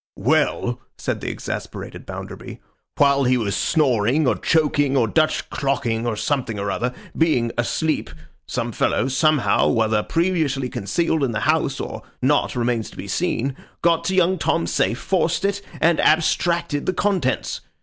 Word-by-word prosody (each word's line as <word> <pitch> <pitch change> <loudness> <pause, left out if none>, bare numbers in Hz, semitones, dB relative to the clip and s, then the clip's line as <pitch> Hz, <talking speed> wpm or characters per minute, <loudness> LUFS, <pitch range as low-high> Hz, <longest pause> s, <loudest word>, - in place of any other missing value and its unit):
'Well!' - - +1 0.2
said - - -3
the - - -3
exasperated - - -6
Bounderby, - - -8 0.4
'while 140 -1 +4
he 125 +1 +3
was 105 -5 -1
snoring, 135 -1 +2
or 125 - +3
choking, 145 -3 +2
or 120 -3 +3
Dutch 155 +7 +1
clocking, 120 -4 -1
or 115 - -1
something 115 -1 -1
or 100 0 -2
other—being 125 +2 -1
asleep—some 155 +6 -3
fellows, 130 +1 0
somehow, 155 -2 +3
whether 110 -2 +2
previously 155 -5 0
concealed 140 - -1
in 125 -4 0
the 110 - -2
house - - +1
or - - -5 0.2
not 145 +1 +1
remains 120 -2 -1
to - - -16
be - - -6
seen, 130 +3 -1 0.3
got 170 -1 +3
to 190 - 0
young 185 0 +3
Tom's 165 +1 0
safe, 115 - +1
forced 175 +3 0
it, 200 0 0 0.2
and 165 0 +3
abstracted 160 -1 +1
the 185 - +2
contents. 185 -9 0
140 Hz, 150 wpm, -22 LUFS, 120-165 Hz, 0.4 s, while